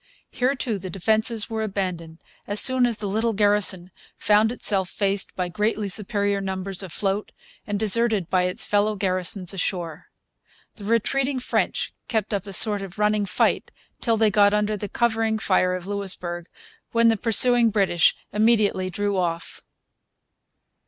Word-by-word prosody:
Here 255 +3 0
too 230 -6 -3
the 185 0 -7
defences 220 +4 +2
were 225 -1 -4
abandoned 185 -6 -4 0.3
as 205 +1 0
soon 260 -1 +5
as 235 -3 0
the 210 - -5
little 220 +3 -1
garrison 205 -3 +1 0.3
found 215 +1 +3
itself 195 -6 0
faced 200 -1 -1
by 180 -1 -2
greatly 210 +3 -2
superior 200 0 -1
numbers 190 0 -4
afloat 195 +2 -3 0.4
and 205 -1 -2
deserted 220 -3 +1
by 180 0 +1
its 180 - 0
fellow 210 +1 +1
garrisons 185 0 -2
ashore. 175 -3 -4 0.7
The 205 - -10
retreating 255 +5 0
French 250 - -2
kept 220 -2 -2
up 200 0 -3
a 195 - -6
sort 205 +1 +5
of 195 0 -9
running 210 -1 +1
fight - - 0 0.3
till 230 -2 0
they 220 -1 +3
got 205 0 +4
under 210 0 0
the 205 0 -6
covering 225 -2 0
fire 185 -3 +1
of 180 -1 -7
Louisbourg, 185 -4 -4 0.5
when 230 0 +4
the 225 - +3
pursuing 235 +2 +4
British 195 -5 +2 0.2
immediately 210 -3 +2
drew 205 +2 -2
off. 170 -2 -3
205 Hz, 150 wpm, -23 LUFS, 190-220 Hz, 0.7 s, soon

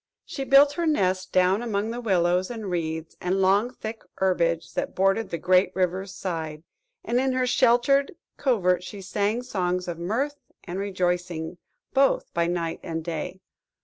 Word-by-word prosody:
She 270 - -5
built 280 +2 +6
her 335 +2 -1
nest 185 -10 +1
down 185 +3 +3
among 220 -2 -1
the 240 +1 -4
willows, 180 -4 +2
and 220 -5 -5
reeds, 160 -2 -3
and 185 +2 0
long 200 +5 +3
thick 225 -2 -7
herbage 170 -3 0
that - - -3
bordered 195 +4 +2
the 170 - -2
great 185 +2 +3
river's 185 +1 -1
side, 160 -5 -5 0.4
and 240 +1 +1
in 265 0 +1
her 255 0 +1
sheltered 255 +4 +3 0.2
covert 180 -10 +1
she 200 +2 -8
sang 205 +5 -1
songs 180 -5 -1
of 170 -1 -4
mirth 255 +12 -1 0.3
and 185 +1 -5
rejoicing 180 -3 -2 0.3
both 275 0 +2
by 170 0 +1
night 170 -1 -2
and 165 -1 -4
day. 170 +3 -5
190 Hz, 160 wpm, -25 LUFS, 175-235 Hz, 0.4 s, built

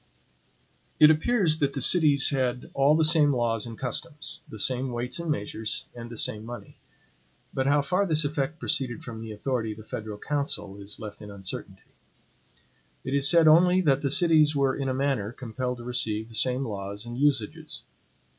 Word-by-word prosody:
It 155 0 +8
appears 160 -1 +2
that 140 -2 0
the 140 - -3
cities 145 -1 +4
had 130 -2 -2
all 140 +2 +4
the 160 - +3
same 155 -2 +5
laws 120 -3 0
and 115 -1 -8
customs, 150 +4 -3
the 110 - -9
same 130 +4 +1
weights 120 +4 -1
and 170 -1 -5
measures, 110 -4 -2
and 120 -1 -9
the 115 - -8
same 105 0 0
money. 120 +2 -10 0.7
But 130 0 -1
how 145 0 +3
far 185 +6 0
this 155 -2 +3
effect 145 +1 -2
proceeded 125 -6 -1
from 115 -2 -8
the 115 -1 -7
authority 115 0 -3
of - - -16
the 110 - -11
federal 110 -1 -6
council 105 -7 -3
is 100 +1 -7
left 105 -2 -9
in 105 - -9
uncertainty. 100 -2 -8 1.1
It 130 - -4
is 140 0 +4
said 165 -2 +5
only 180 +4 +6
that 140 -5 +2
the 140 - 0
cities 155 -1 +3
were 135 -2 +1
in 135 -1 -3
a - - 0
manner 130 -6 -1
compelled 125 +1 -5
to 120 - -10
receive 110 -2 -1
the - - -14
same 130 +3 +1
laws 100 -1 -6
and 120 0 -7
usages. 130 -5 -1
130 Hz, 185 wpm, -26 LUFS, 115-150 Hz, 1.1 s, It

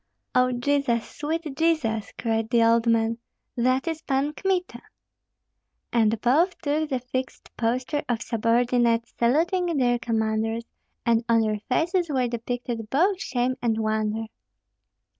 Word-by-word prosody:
"O 250 0 +3
Jesus! 245 -2 0
sweet 320 +3 -3
Jesus!" 275 -10 0
cried 225 -1 -1
the 235 -1 +4
old 230 +1 +3
man, 230 0 +2 0.4
"that 255 +5 +1
is 325 -1 -2
Pan 280 0 0
Kmita!" 370 +1 -2 1.1
And 225 -2 +3
both 315 +10 +3
took 300 +1 -1
the 265 - 0
fixed 255 +1 -5
posture 255 +5 -1
of 235 -2 -1
subordinates 235 0 +1
saluting 335 +7 +2
their 245 -2 +2
commanders, 225 -1 -1 0.4
and 230 0 +3
on 230 -1 +5
their 215 -1 0
faces 340 +6 +1
were 260 -4 +1
depicted 235 -1 -4
both 365 - +2
shame 255 0 -1
and 225 -2 +1
wonder. 220 0 -1
245 Hz, 130 wpm, -25 LUFS, 230-290 Hz, 1.1 s, on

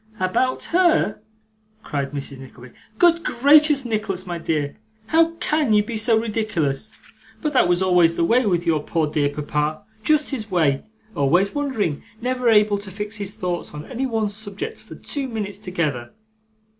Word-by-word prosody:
'About 185 +8 0
HER!' 345 - +3 0.6
cried 140 -2 -3
Mrs. 140 -2 -5
Nickleby. 125 -2 -13 0.2
'Good 340 -1 +4
gracious, 290 +1 +4
Nicholas, 210 -5 -2
my 175 -2 -4
dear, 150 -3 -2 0.3
how 330 +6 +3
CAN 305 -7 +1
you 210 0 +4
be 225 +2 -5
so 220 +1 +3
ridiculous! 215 -7 -1 0.5
But 300 -2 -2
that 255 - +4
was 175 +1 +2
always 175 -3 +4
the 170 - +1
way 240 +8 +3
with 175 -2 +1
your 160 -3 +2
poor 160 +1 0
dear 150 -1 0
papa, 150 +1 -2 0.2
just 305 +5 +2
his 220 -6 -4
way 155 -7 +2 0.3
always 175 +8 +2
wandering, 260 - -1 0.2
never 250 0 0
able 210 -2 +4
to 200 -1 -8
fix 210 +3 -5
his 200 -1 -5
thoughts 175 -4 -4
on 150 - -7
any 260 +2 -3
one 225 -3 0
subject 220 - -5
for - - -12
two 280 -2 -4
minutes 210 -4 -4
together. 155 - -3
205 Hz, 165 wpm, -22 LUFS, 165-250 Hz, 0.6 s, Good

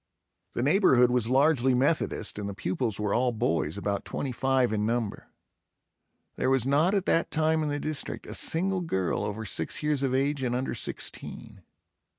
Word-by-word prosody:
The 120 - -1
neighborhood 135 -7 +4
was 120 -2 +1
largely 135 -1 +3
Methodist 140 -4 0
and 100 -1 -4
the 100 - -6
pupils 105 +3 -2
were 105 -1 0
all 125 +1 +2
boys, 90 -8 -1
about 100 0 -2
twenty 135 - -4
five 130 -1 +1
in 105 -1 0
number. 115 -1 -2 1.1
There 130 - +1
was 135 -3 +2
not 150 +8 +3
at 195 -2 0
that 165 - +2
time 160 0 +1
in 150 - -1
the 145 0 -2
district 155 0 -3
a - - -7
single 185 +3 +1
girl 95 - -1
over 105 +2 -4
six 85 - -2
years 150 -2 +1
of 130 -2 0
age 140 +1 0
and 125 -2 -1
under 130 +2 -2
sixteen. - - -6
130 Hz, 175 wpm, -27 LUFS, 110-150 Hz, 1.1 s, neighborhood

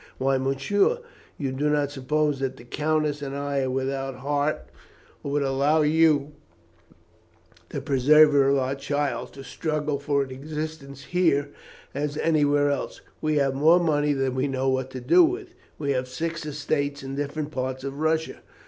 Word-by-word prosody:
Why, 135 0 +1
Monsieur, 135 - +1 0.4
you 135 -3 -2
do 145 +3 0
not 145 -1 +1
suppose 145 +1 0
that 135 -1 -3
the - - -12
countess 150 +3 -1
and 140 -1 -5
I 140 0 -1
are 130 - -1
without 135 +1 -2
heart, 145 +3 -1 0.6
or - - -5
would 145 0 +1
allow 140 +3 +2
you, 150 -2 +3 1.4
the - - -4
preserver 145 +1 +5
of 140 - +3
our 130 0 0
child, 140 -3 -2
to 135 - -10
struggle 150 0 -2
for 140 -1 +1
an 130 - -9
existence 145 0 -6
here 145 -5 +1 0.4
or 145 +2 -1
anywhere 145 -2 +3
else! 140 - -4 0.2
We 155 0 +1
have 140 -2 +2
more 155 +6 +5
money 150 -3 +2
than 135 -2 -1
we 130 +2 0
know 135 -1 0
what 130 0 -1
to 130 -1 -7
do 355 - +6
with. 365 +2 -1 0.2
We 140 -2 -1
have 130 -1 -1
six 165 +3 -4
estates 145 -1 -2
in 135 0 -6
different 145 +2 -3
parts 130 -1 -3
of 140 +1 -5
Russia. 160 +1 -1
145 Hz, 165 wpm, -25 LUFS, 135-150 Hz, 1.4 s, do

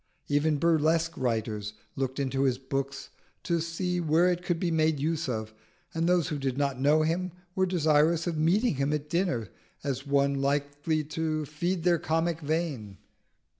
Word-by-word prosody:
Even 145 +1 +2
burlesque 165 +1 +2
writers 110 -4 -2 0.2
looked 135 -1 -2
into 135 -1 0
his 130 -2 +2
book 135 +1 -2 0.5
to 170 -2 +1
see 175 +2 -2
where 165 +3 +3
it 175 0 -2
could 175 -1 -1
be 175 -1 0
made 155 -2 +2
use 160 +1 -1
of, 110 -2 -3 0.4
and 165 +1 +1
those 180 -3 +2
who 150 - -3
did 135 -1 -2
not 140 -2 -1
know 150 +3 +4
him 175 +3 -1 0.2
were 190 0 +1
desirous 160 -1 +3
of 170 -2 -1
meeting 170 - +2
him 140 +2 +1
at 150 0 -3
dinner 170 - 0 0.3
as 135 0 -3
one 140 0 +3
likely 145 +2 0
to 155 0 -2
feed 170 +4 -2
their 175 -2 +3
comic 165 +1 0
vein. 145 - -2
155 Hz, 170 wpm, -28 LUFS, 140-170 Hz, 0.5 s, know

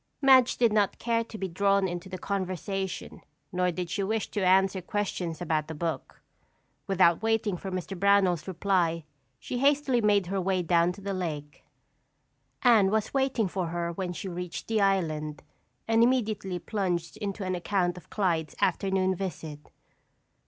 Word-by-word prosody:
Madge 260 -3 +5
did 235 -3 +3
not 205 -2 +2
care 230 -1 0
to 230 -1 -10
be 195 - -3
drawn 195 +2 +2
into 175 +1 -6
the 185 - -5
conversation 190 0 -4 0.3
nor 180 -1 +1
did 180 0 -3
she 200 - -2
wish 220 +2 -1
to 205 - -1
answer 190 +1 +3
questions 180 -4 -3
about 155 -3 -1
the 160 - -6
book. 160 -3 -4 0.6
Without 180 -3 +4
waiting 225 -3 +1
for 190 +2 -6
Mr. 185 +1 -4
Brownell's 195 -3 +3
reply, 175 -3 0 0.3
she 245 - -5
hastily 275 -3 +3
made 205 -3 +3
her 190 +2 -2
way 185 0 0
down 170 0 +3
to 200 - -13
the 200 0 -3
lake. 150 -5 -5 1.0
Anne 225 -6 +6
was 215 +1 -1
waiting 265 -5 +1
for 185 -1 -2
her 170 0 -2
when 180 +1 -4
she 180 - -6
reached 180 -1 -6
the 220 -2 +1
island 155 -6 0 0.4
and 225 0 +3
immediately 215 -6 +1
plunged 175 -3 -2
into 205 -1 -4
an 185 0 -2
account 180 0 0
of 180 - -13
Clyde's 170 -6 -1
afternoon 190 -1 +1
visit. 160 -5 -6
190 Hz, 160 wpm, -28 LUFS, 175-205 Hz, 1.0 s, Anne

